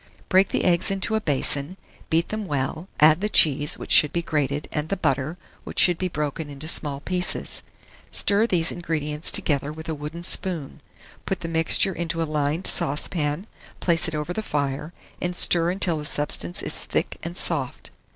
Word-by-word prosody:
Break 190 +1 +4
the - - -1
eggs 170 -2 +2
into 195 +3 -3
a 220 - 0
basin, 145 +2 +1 0.3
beat 165 +1 +1
them 215 -2 -5
well; 145 +4 -3
add 155 +3 +5
the 210 - -1
cheese, 145 -5 +4
which - - -9
should 150 - +7
be 170 - -2
grated, 145 -2 -2
and 150 +1 -3
the 195 - -2
butter, 140 +1 -1 0.3
which - - -10
should 175 -2 +4
be 185 - -1
broken 150 -2 -4
into 145 +2 -8
small 145 -3 +2
pieces. 180 +2 0 0.5
Stir 205 +3 +2
these 170 -6 +1
ingredients 155 -3 -1
together 145 -1 0
with 160 +1 -10
a 160 - -2
wooden 150 +3 -7
spoon; 170 -5 -1 0.5
put 190 - -3
the 165 - -5
mixture 165 +3 +4
into 165 -1 -4
a - - +1
lined 150 +2 -2
saucepan, 150 +4 +1 0.3
place 170 0 +3
it 160 - -4
over 150 +3 -4
the 220 - -3
fire, 145 -3 -3 0.3
and 180 0 -3
stir 170 -1 +3
until 180 -3 +1
the 150 - -7
substance 145 -13 -1
is - - -3
thick - - -2
and 170 +2 -6
soft. 140 -7 -1
160 Hz, 180 wpm, -23 LUFS, 145-175 Hz, 0.5 s, should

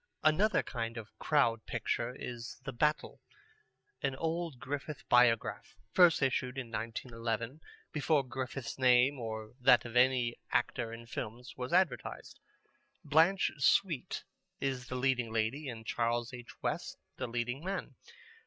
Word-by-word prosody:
Another 185 +7 +4
kind 115 -1 -4
of 110 -2 -9
Crowd 115 -7 +2
Picture 120 +1 -1
is 120 -1 -6
The 135 -1 -5
Battle, 150 +5 0 0.8
an 135 -1 0
old 165 -2 -2
Griffith 145 +2 -5
Biograph, 120 -2 +3 0.2
first 175 -5 +6
issued 130 -1 0
in 125 -4 -5
1911, 115 +3 -3 0.3
before 150 -2 +2
Griffith's 130 -1 -5
name 130 +2 +5
or 110 -1 -5
that 125 -2 +6
of 120 0 -7
any 125 -1 +3
actor 120 -1 0
in 115 0 -8
films 120 +1 -6
was 125 0 -5
advertised. 180 -5 0 0.6
Blanche 160 +6 +4
Sweet 155 0 +2 0.4
is 130 -3 -2
the 130 - -4
leading 125 -3 +1
lady, 115 +6 -1
and 115 -2 -7
Charles 120 +2 0
H. 120 -1 -9
West - - -2 0.2
the - - -3
leading 120 +4 -2
man. 195 +2 -3
125 Hz, 135 wpm, -33 LUFS, 115-140 Hz, 0.8 s, first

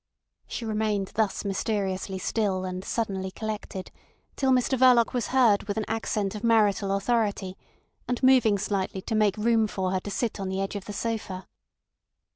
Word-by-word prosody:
She 235 - -5
remained 210 -3 -1
thus 215 -1 -1
mysteriously 195 -1 -2
still 190 -1 -1
and 185 0 -4
suddenly 195 -4 -2
collected 210 -2 -6 0.4
till 270 - +1
Mr 255 +1 +3
Verloc 250 -2 +5
was 245 -3 -1
heard 235 -7 +4
with 205 0 -2
an 215 - -1
accent 215 -3 -1
of 210 - -7
marital 210 -4 +3
authority, 200 -2 0 0.5
and 250 +1 -2
moving 250 -6 +5
slightly 195 -1 -2
to 225 - -4
make 215 -2 +2
room 225 0 +3
for 190 -2 -2
her 190 - +1
to 205 - -7
sit 215 +2 -2
on 195 -1 -3
the 190 0 -2
edge 195 +1 -2
of 200 - -5
the 205 - -6
sofa. 205 -4 -3
210 Hz, 170 wpm, -27 LUFS, 195-225 Hz, 0.5 s, Verloc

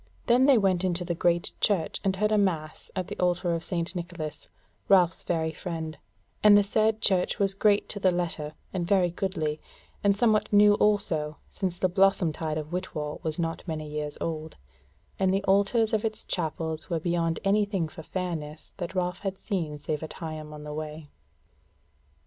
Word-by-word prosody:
Then 250 +2 +5
they 275 -3 +7
went 190 -4 +2
into 180 -1 0
the 175 - -1
Great 170 0 +1
Church 190 -7 +1
and 195 -1 +1
heard 210 +2 +1
a 215 - +4
Mass 160 -6 -1
at 185 -2 -2
the - - -7
altar 175 -1 +1
of 165 -1 -2
St. 170 0 -2
Nicholas, 165 -4 -6 0.4
Ralph's 185 -3 +5
very 160 -2 -1
friend; 160 -2 -5 0.5
and 210 -1 +9
the 205 - +5
said 220 +2 +1
church 185 -2 +2
was 195 -1 +2
great 205 +1 +3
to 205 - -5
the 190 - +4
letter, 165 -4 -2 0.2
and 175 -2 -2
very 185 -3 +3
goodly, 160 -5 -2 0.4
and 200 -1 +3
somewhat 215 -2 +2
new 205 0 +7
also, 170 -8 +1
since 185 -3 -3
the 185 - +2
blossom 190 -2 +3
tide 155 0 -3
of 155 +2 -5
Whitwall 155 -5 -3
was 155 -1 -3
not 165 -1 -2
many 155 -2 -4
years 150 0 -4
old: 160 -1 -4 0.6
and 190 -1 +3
the 195 +1 +1
altars 205 +4 +3
of 215 - +1
its 220 -1 -3
chapels 160 -1 -3
were 170 -2 0
beyond 165 -1 0
any 205 +2 +3
thing 195 -5 -1
for 160 - -10
fairness 160 -3 -5
that 180 0 -5
Ralph 180 0 -1
had 195 -1 -3
seen 165 -9 -3
save 150 0 -3
at 160 - -6
Higham 155 -2 -6
on 150 0 -9
the 150 0 -6
Way. 155 -1 -6
175 Hz, 185 wpm, -27 LUFS, 160-195 Hz, 0.6 s, and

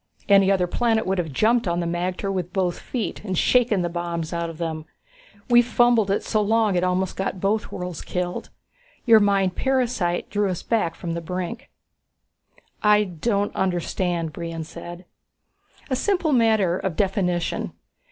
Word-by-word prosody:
Any 195 -1 +5
other 185 -2 +2
planet 225 +4 +1
would 190 0 0
have 165 -4 -2
jumped 225 - +2
on 170 0 0
the 175 - -1
magter 180 +3 -2
with 180 -2 -3
both 180 -2 -1
feet 225 -7 -4
and 190 -4 -3
shaken 230 -5 +3
the - - 0
bombs 170 -1 -4
out 170 0 -2
of 165 - -9
them. 160 -2 -4 0.6
We 240 -1 +6
fumbled 240 -3 +3
it 195 - 0
so 215 - 0
long 220 0 +2
it 175 - +1
almost 185 0 0
got 190 0 -3
both 205 +3 0
worlds 180 -3 -5
killed. 180 0 -4 0.6
Your 230 -3 +7
mind 195 -3 +2
parasite 245 -10 0
drew 205 -1 +1
us 180 - -4
back 215 -8 0
from 170 -1 -5
the 170 - -3
brink." 185 - -5 1.1
"I 210 0 +5
don't 200 +3 -1
understand," 175 -2 -1
Brion 165 -1 -5
said. 175 +3 -9 0.9
"A - - +3
simple 355 0 +1
matter 220 -7 +3
of 190 -4 -3
definition. 180 -3 -1
190 Hz, 160 wpm, -23 LUFS, 175-220 Hz, 1.1 s, Your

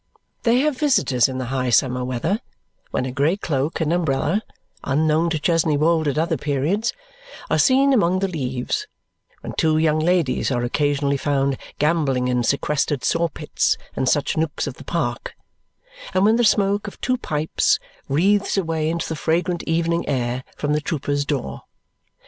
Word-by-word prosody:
They 240 +1 +3
have 295 -3 0
visitors 140 - +3
in 130 - -4
the 130 - -3
high 130 -1 0
summer 125 +1 +2
weather, 130 - -1 0.5
when 130 - -1
a 130 - -3
grey 145 +8 +1
cloak 145 -4 -2
and 160 0 +1
umbrella, 165 +3 0 0.4
unknown 155 +4 +2
to 165 - 0
Chesney 160 -1 +1
Wold 160 +1 +2
at 145 - -1
other 160 0 +1
periods, 150 - 0 0.6
are - - +3
seen 270 +1 +4
among 185 -7 +3
the 195 +1 0
leaves; 135 - -3 0.5
when - - -6
two 155 -3 +3
young 155 -1 +2
ladies 165 -4 +1
are 120 -3 -1
occasionally 140 +2 0
found 140 -1 0 0.2
gambolling 145 -5 +1
in 125 -1 +1
sequestered 140 +2 0
saw 170 0 +1
pits 160 - -1 0.2
and 130 - +1
such 145 - +1
nooks 160 -1 -1
of - - -4
the - - -11
park; - - -3 0.8
and 185 +1 +4
when 220 +2 +4
the 240 - +2
smoke 205 -1 +2
of 200 - -9
two 255 0 0
pipes 155 -9 +1 0.3
wreathes 195 +9 +2
away 160 -4 0
into 165 +1 -2
the 160 - -3
fragrant 170 +3 0
evening 170 0 0
air 125 -1 -1
from 150 0 -1
the 150 - +1
trooper's 145 -2 -2
door. 140 -3 -3
155 Hz, 165 wpm, -22 LUFS, 140-175 Hz, 0.8 s, seen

